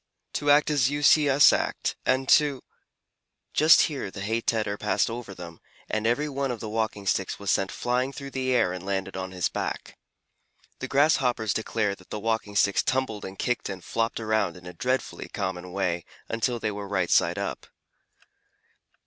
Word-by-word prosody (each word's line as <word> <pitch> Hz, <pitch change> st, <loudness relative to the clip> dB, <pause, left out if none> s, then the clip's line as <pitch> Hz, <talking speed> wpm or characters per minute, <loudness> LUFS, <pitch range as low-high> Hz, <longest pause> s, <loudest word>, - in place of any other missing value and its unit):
To 145 Hz, -, -1 dB
act 145 Hz, +1 st, +5 dB
as 135 Hz, -4 st, +3 dB
you 145 Hz, +1 st, -3 dB
see 145 Hz, 0 st, +6 dB
us 140 Hz, +2 st, +7 dB
act, -, -, -1 dB
and 130 Hz, +1 st, +2 dB
to 145 Hz, -3 st, +4 dB, 0.4 s
" -, -, -53 dB
Just 155 Hz, +1 st, +8 dB
here 140 Hz, -9 st, -1 dB
the 100 Hz, -, -8 dB
hay 110 Hz, +3 st, -1 dB
tedder 110 Hz, -3 st, 0 dB
passed 105 Hz, +2 st, 0 dB
over 115 Hz, -4 st, -7 dB
them, 85 Hz, -2 st, -10 dB, 0.3 s
and 110 Hz, +1 st, -1 dB
every 145 Hz, +6 st, +1 dB
one 140 Hz, -1 st, -2 dB
of 120 Hz, -2 st, -3 dB
the 110 Hz, -, -6 dB
Walking 110 Hz, -2 st, -2 dB
Sticks 95 Hz, -1 st, 0 dB
was 100 Hz, -2 st, -1 dB
sent 95 Hz, -1 st, +1 dB
flying 125 Hz, +2 st, -1 dB
through 140 Hz, 0 st, -8 dB
the 130 Hz, -1 st, -1 dB
air 115 Hz, -8 st, +2 dB
and 90 Hz, -1 st, -7 dB
landed 95 Hz, 0 st, -3 dB
on 95 Hz, 0 st, -4 dB
his 90 Hz, -1 st, 0 dB
back. -, -, -5 dB, 0.8 s
The -, -, -4 dB
Grasshoppers 130 Hz, -6 st, +2 dB
declare 110 Hz, -2 st, -1 dB
that 95 Hz, -2 st, -15 dB
the 105 Hz, -, -4 dB
Walking 110 Hz, -1 st, -2 dB
Sticks 100 Hz, 0 st, +3 dB
tumbled 130 Hz, -5 st, -1 dB
and 95 Hz, 0 st, -8 dB
kicked 120 Hz, +1 st, -1 dB
and 95 Hz, -3 st, -6 dB
flopped 115 Hz, 0 st, -1 dB
around 110 Hz, -5 st, 0 dB
in 90 Hz, -, -14 dB
a 90 Hz, -, -8 dB
dreadfully 130 Hz, +5 st, -2 dB
common 95 Hz, -3 st, -4 dB
way 90 Hz, -3 st, -1 dB, 0.2 s
until 115 Hz, +2 st, -1 dB
they 110 Hz, -2 st, -2 dB
were 100 Hz, 0 st, -6 dB
right 95 Hz, -3 st, -1 dB
side -, -, +3 dB
up. -, -, -4 dB
110 Hz, 190 wpm, -26 LUFS, 95-130 Hz, 0.8 s, Just